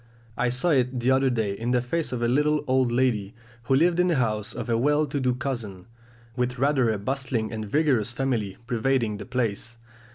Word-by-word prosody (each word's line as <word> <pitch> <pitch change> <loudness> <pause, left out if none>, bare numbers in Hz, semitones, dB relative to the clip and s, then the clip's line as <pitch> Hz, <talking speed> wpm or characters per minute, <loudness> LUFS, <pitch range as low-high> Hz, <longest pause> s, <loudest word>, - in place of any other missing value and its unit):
I 125 +1 +1
saw 125 +8 +1
it 125 -3 +1
the 120 +2 +2
other 135 0 +3
day 110 -5 -1
in 115 +4 -4
the 125 0 +3
face 165 +6 -2
of 120 -2 -2
a - - +2
little 150 +4 +2
old 130 -2 +2
lady, 120 -5 0 0.3
who 135 - +3
lived 170 +4 +3
in 180 - +4
the 170 - +2
house 110 -3 -1
of - - -5
a 115 - +1
well 150 +6 +2
to 145 0 -3
do 125 -2 +1
cousin, 115 -9 -5 0.5
with 125 0 -1
rather 135 -2 +2
a 110 - 0
bustling 120 -1 -2
and 110 -2 -5
vigorous 130 -6 +2
family 120 -6 -2
pervading 115 -2 0
the - - -9
place. 115 -2 -2
125 Hz, 205 wpm, -25 LUFS, 115-135 Hz, 0.5 s, in